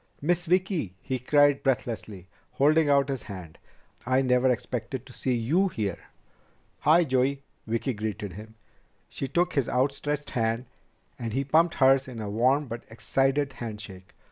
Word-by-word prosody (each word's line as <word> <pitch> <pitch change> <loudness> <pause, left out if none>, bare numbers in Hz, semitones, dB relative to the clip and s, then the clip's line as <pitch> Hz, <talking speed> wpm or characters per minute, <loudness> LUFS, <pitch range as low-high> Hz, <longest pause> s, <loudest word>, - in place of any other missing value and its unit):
"Miss 175 +3 0
Vicki!" 180 - 0
he 130 -1 -3
cried 145 +2 +4
breathlessly, 110 -7 -2 0.3
holding 150 +2 +3
out 140 -1 +4
his 135 -4 -3
hand. 90 -6 -9 0.4
"I 130 +2 +2
never 125 0 +3
expected 125 0 -3
to 125 - -14
see 125 +2 -1
you 150 +12 +2
here!" 105 - -3 0.8
"Hi, 165 +3 +5
Joey!" 135 -1 0 0.2
Vicki 115 +4 -1
greeted 105 -3 -4
him. 110 +3 -11 0.5
She 135 - -4
took 175 +6 +1
his 140 -4 0
outstretched 145 +3 -1
hand, 115 +1 0 0.5
and 115 -2 -4
he 135 +3 0
pumped 160 +5 +3
hers 135 0 +4
in 125 -3 -8
a 105 -2 -4
warm 130 +7 +2
but 120 -2 -7
excited 135 +4 0
handshake. 105 -6 -8
130 Hz, 150 wpm, -27 LUFS, 115-145 Hz, 0.8 s, Hi